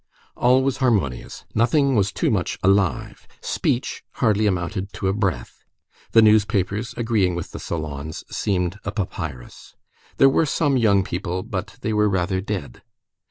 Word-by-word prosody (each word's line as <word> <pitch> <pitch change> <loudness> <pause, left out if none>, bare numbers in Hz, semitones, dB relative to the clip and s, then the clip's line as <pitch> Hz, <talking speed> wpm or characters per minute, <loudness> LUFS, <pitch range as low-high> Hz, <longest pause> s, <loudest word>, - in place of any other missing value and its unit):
All 130 +2 +3
was 135 -1 0
harmonious; 105 - -1
nothing 135 +4 +2
was 100 -3 +2
too - - 0
much - - -1
alive; 95 -1 +1
speech - - -2
hardly 105 0 +2
amounted 95 +1 -2
to 95 - -3
a 95 - +2
breath; 100 -4 -3 0.5
the 115 - +7
newspapers, 105 0 +2
agreeing 110 -7 +1
with 85 - -5
the - - -7
salons, 75 -1 -5
seemed 90 -1 -1
a 100 - -3
papyrus. 80 - -6 0.4
There 135 - +7
were 145 +4 +3
some 145 -1 +1
young 105 -6 +3
people, 90 0 -3
but 100 -5 -5
they 110 - -1
were 105 0 +3
rather 95 0 0
dead. 95 - -5
100 Hz, 150 wpm, -22 LUFS, 90-110 Hz, 0.5 s, the